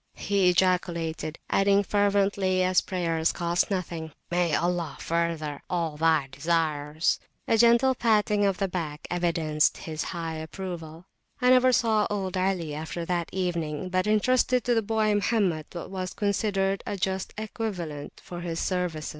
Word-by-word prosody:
he 200 -3 +2
ejaculated, 170 -3 0
adding 200 +1 +3
fervently, 200 -2 +2
as 185 0 +3
prayers 165 -3 0
cost 175 0 0
nothing, 170 -5 -3 0.2
May 175 -2 +2
Allah 170 -4 -1
further 165 -3 -2
all 170 -4 -1
thy 160 -2 +2
desires. 155 0 0 0.3
A - - +3
gentle 235 +3 +5
patting 210 -3 +2
of 195 -2 +2
the 195 - 0
back 160 -5 -5
evidenced 165 -3 +1
his 155 -2 -5
high 165 -2 -4
approval. 165 0 -7 0.3
I 250 -1 +4
never 255 0 +6
saw 220 -3 +2
old 190 -3 -2
Ali 185 -4 0
after 160 +3 -5
that 175 -1 -1
evening, 175 -2 -2
but 185 +2 0
entrusted 250 +3 +3
to 245 - +2
the 225 - +2
boy 215 0 +1
Mohammed 200 -7 +1
what 175 +1 -7
was 185 -1 -4
considered 195 -1 0
a 200 - -2
just 190 0 -2
equivalent 190 -9 -5
for 175 -1 -7
his 170 -1 -3
services. 180 -4 -2
180 Hz, 145 wpm, -27 LUFS, 165-200 Hz, 0.3 s, never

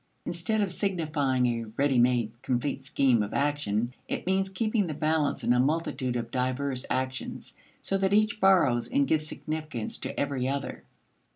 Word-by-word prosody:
Instead 175 +6 0
of 200 -3 0
signifying 155 -9 0
a 115 -1 0
ready 140 -2 +3
made 120 -2 +3
complete 130 +2 -1
scheme 130 -5 +3
of 105 0 -3
action, 130 -5 0
it - - -3
means 190 +1 +1
keeping 215 +1 0
the 155 - -4
balance 155 -1 0
in 120 - +3
a 125 - +2
multitude 135 -3 0
of 120 -1 -3
diverse 130 +1 -1
actions, 130 0 -3 0.3
so 195 - 0
that 190 0 +1
each 215 0 +3
borrows 175 - +4
and 280 +1 +2
gives 155 -1 +1
significance 155 -8 -4
to - - -5
every 140 -3 -1
other. 140 0 -3
140 Hz, 165 wpm, -28 LUFS, 125-175 Hz, 0.3 s, borrows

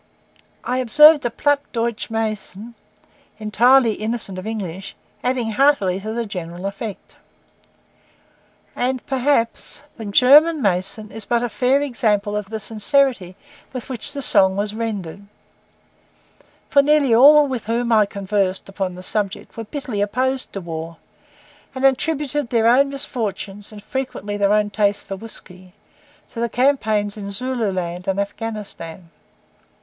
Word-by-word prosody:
I 250 +1 -1
observed 300 +5 +6
a - - +2
Platt 290 +4 +1
Deutsch 230 -2 -2
mason, 220 0 -4 0.6
entirely 230 +3 +4
innocent 215 -3 -4
of 185 - -7
English, 195 -3 -5 0.3
adding 245 -3 -1
heartily 210 -7 +2
to 215 +2 -5
the 235 +1 -2
general 180 -2 -7
effect. 200 +1 -7 1.6
And 255 0 -2
perhaps 265 -1 -1
the 225 - -7
German 290 +10 +6
mason 205 0 -1
is 220 0 -6
but 240 0 0
a 245 - -1
fair 265 +5 +1
example 210 -6 0
of 210 -1 -3
the 220 0 -4
sincerity 220 -3 +1 0.4
with 255 -1 -7
which 245 -4 -4
the 280 - -4
song 190 -5 +4
was 205 +1 -2
rendered; 205 -4 -5 1.4
for 280 - +5
nearly 285 -3 +3
all 290 +5 +7
with 260 -5 -4
whom 235 +2 -1
I 215 -2 +4
conversed 195 -1 -1
upon 195 -2 -3
the 185 - -10
subject 200 0 -2
were 225 - -6
bitterly 250 -4 -4
opposed 255 +6 -1
to 195 - -5
war, 165 -1 -6 0.8
and 260 +1 0
attributed 290 0 +1
their 230 -2 +2
own 260 +4 +5
misfortunes, 210 -7 -5
and 210 -1 -11
frequently 250 -6 -4
their 200 -1 +2
own 210 0 +2
taste 205 0 0
for 195 - -5
whisky, 185 -3 -12 0.6
to 230 - -8
the 235 0 0
campaigns 220 -6 +1
in 200 -1 -6
Zululand 195 -7 -3
and 195 0 0
Afghanistan. 200 -6 -6
220 Hz, 140 wpm, -20 LUFS, 200-255 Hz, 1.6 s, all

